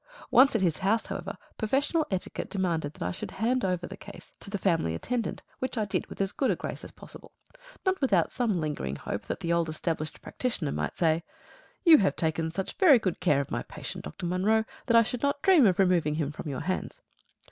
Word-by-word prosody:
Once 265 0 +6
at 210 - +2
his 165 -4 +1
house, 215 +4 +1
however, - - -5 0.2
professional 280 +8 +1
etiquette 190 -2 -3
demanded 170 -7 -1
that - - -6
I 90 - -1
should - - -6
hand 245 +5 0
the 180 -3 -2
case 205 - -12
over - - -32
to - - -9
the 200 - -2
family 165 - +1
attendant, 235 - -3 0.2
which 260 -1 -3
I 215 - +1
did 200 - -2
with - - -11
as 195 0 0
good 270 - 0
a - - +2
grace - - -6
as - - -8
possible - - -12 0.5
not 375 -2 +1
without 195 -11 +3
some 225 -7 0
lingering 145 - -3
hope - - -5
that - - -4
the 170 0 0
old 170 -1 +1
established 155 -1 -3
practitioner 190 - -3
might - - -3
say, 165 -1 +2 0.6
"You 325 -3 +9
have 195 - +2
taken 160 -1 0
such 190 +4 -4
very 315 -9 +8
good 190 -6 -2
care 150 -6 +3
of 140 - -7
my - - -1
patient, - - -7
Dr. 75 - -6
Munro, 200 +5 +2 0.2
that 235 -2 +5
I 230 - +7
should 245 +2 -4
not 280 0 0
dream 350 - +6
of 185 - +2
removing 175 -6 +3
him 150 -2 -1
from 150 - -7
your 135 - -3
hands." 185 - -3
190 Hz, 220 wpm, -28 LUFS, 160-235 Hz, 0.6 s, You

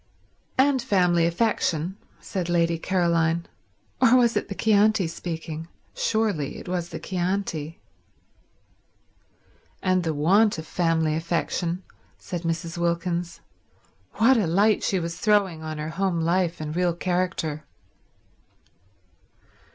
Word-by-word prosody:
"And 265 0 +3
family 175 -5 +3
affection," 175 -3 0 0.2
said 185 -5 -4
Lady 170 -1 +2
Caroline—or 170 +7 0
was 235 -2 +3
it - - -1
the 200 - -5
Chianti 215 -2 +3
speaking? 165 -1 -5 0.3
Surely 210 -11 -1
it - - -10
was 175 -1 -2
the 165 - -6
Chianti. 180 -4 -3 2.0
"And 185 -1 +1
the 160 -2 -1
want 195 +8 +3
of 160 - -6
family 165 -2 +1
affection," 170 +2 -2 0.3
said 175 -2 -5
Mrs. 165 +1 -3
Wilkins—what 170 - -2
a 205 -6 +1
light 205 +6 +3
she 190 - 0
was 170 0 -5
throwing 200 -6 +2
on 155 -1 -5
her 150 +1 -4
home 190 0 -1
life 170 +1 +1
and 155 0 -5
real 175 -1 +1
character. 175 -4 -2
175 Hz, 110 wpm, -25 LUFS, 165-195 Hz, 2.0 s, And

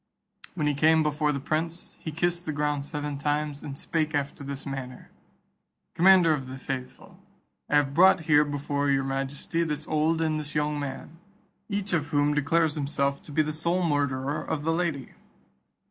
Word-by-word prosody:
When 155 -4 -1
he 150 - +2
came 160 +3 +4
before 150 0 +1
the 140 - -2
prince, 160 +5 -3
he 160 - -5
kissed 175 +2 -1
the - - 0
ground 145 -1 -1
seven 145 -2 -4
times, 145 0 -1
and 140 -1 -7
spake 155 0 -1
after 140 0 -2
this 140 0 -6
manner: 130 -2 -7 0.8
"Commander 180 -2 +6
of 135 -4 -3
the 130 +1 -7
faithful, 130 -1 -7 0.5
I - - +2
have 140 -2 +3
brought 180 +2 +6
here 150 -2 +5
before 145 0 -1
your 135 -1 +2
majesty 135 +5 -2
this 150 -2 -3
old 155 +1 +1
and 155 -1 0
this 150 +1 -6
young 150 0 0
man, 145 +3 -6 0.5
each 200 -2 -2
of 150 -4 +1
whom 145 0 +2
declares 150 +2 +2
himself 140 -2 -1
to - - -12
be 155 +2 +2
the 155 0 -3
sole 170 +4 0
murderer 145 -2 0
of 145 - -3
the 165 +1 +1
lady." 165 -6 -2
150 Hz, 175 wpm, -27 LUFS, 140-160 Hz, 0.8 s, Commander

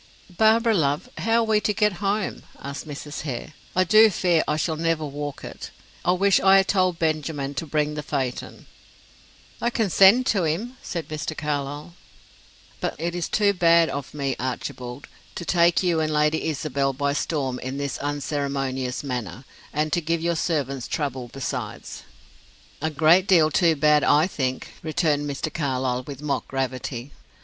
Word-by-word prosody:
"Barbara, 225 +3 +4
love, 150 - 0
how 230 +1 +2
are - - +2
we 220 -1 +2
to 210 - 0
get 210 -1 +2
home?" 200 0 -1 0.2
asked 140 +3 -7
Mrs. 150 0 -6
Hare. 140 0 -5 0.2
"I 185 - +4
do 215 +4 +6
fear 175 -4 +2
I 150 - 0
shall 160 0 -1
never 165 -1 0
walk 145 0 -6
it. - - -8 0.3
I 180 - +3
wish 195 +1 +3
I 195 0 +6
had 195 0 +3
told 185 -3 +2
Benjamin 155 -3 -1
to 160 +4 -4
bring 150 0 0
the 150 - -4
phaeton." 135 -4 -4 1.0
"I 235 - +2
can 220 -5 -1
send 200 +9 +6
to 200 -7 +1
him," 205 +12 -2
said 170 -2 -5
Mr. 155 0 -5
Carlyle. 145 +2 -3 0.9
"But - - -2
it 170 +2 -2
is 175 -1 -3
too 205 -2 +3
bad 170 -2 +4
of 140 -1 -5
me, 140 -3 -2
Archibald, 125 +1 -5 0.3
to 175 - -5
take 170 +1 +3
you 175 -3 +2
and 155 -1 0
Lady 150 +1 +1
Isabel 140 -3 -1
by 140 +2 0
storm 135 -4 -2
in 130 +2 -5
this 140 -1 -3
unceremonious 140 -3 -2
manner; 125 - -5 0.3
and 150 +1 -1
to 175 - +2
give 165 +1 -1
your 170 0 +1
servants 140 -6 -1
trouble 130 -5 -3
besides." 135 -2 -5 0.8
"A 160 - 0
great 160 +5 +4
deal 160 -4 +5
too 165 -1 +3
bad, 150 0 +4
I 150 +2 +5
think," 130 -8 -3
returned 155 -2 0
Mr. 145 +2 -4
Carlyle, 130 -4 -1
with 140 0 -8
mock 145 -2 -2
gravity. 130 -1 -4
155 Hz, 170 wpm, -24 LUFS, 140-175 Hz, 1.0 s, do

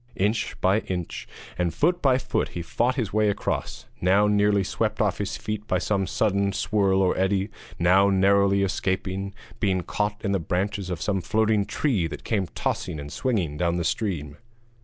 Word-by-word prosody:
Inch 105 +4 -1
by 95 +3 +4
inch, 90 -5 -5 0.3
and 90 -1 +1
foot 175 +3 +2
by 130 -3 +4
foot - - -1
he 85 - -3
fought 120 +8 0
his 115 -8 -2
way 105 -1 +3
across, 100 - -3 0.2
now 95 +3 +4
nearly 105 -1 +3
swept - - -2
off - - +1
his - - -2
feet 105 0 -5
by - - +1
some 100 -3 0
sudden 100 -2 +1
swirl 100 -2 +2
or 90 - +2
eddy, 95 +1 +1 0.3
now 95 +3 +4
narrowly 100 0 +4
escaping 95 0 -2 0.3
being 95 -4 +1
caught 105 +3 -2
in 100 - +1
the 100 - +1
branches 95 +3 -2
of 85 -3 -3
some 95 -3 0
floating 110 +2 +2
tree 110 - 0
that - - -8
came 100 -5 0
tossing 75 - -2
and 70 0 -7
swinging 95 - -1
down 85 +1 +1
the 85 - -1
stream. 80 -7 -2
100 Hz, 180 wpm, -25 LUFS, 95-105 Hz, 0.3 s, by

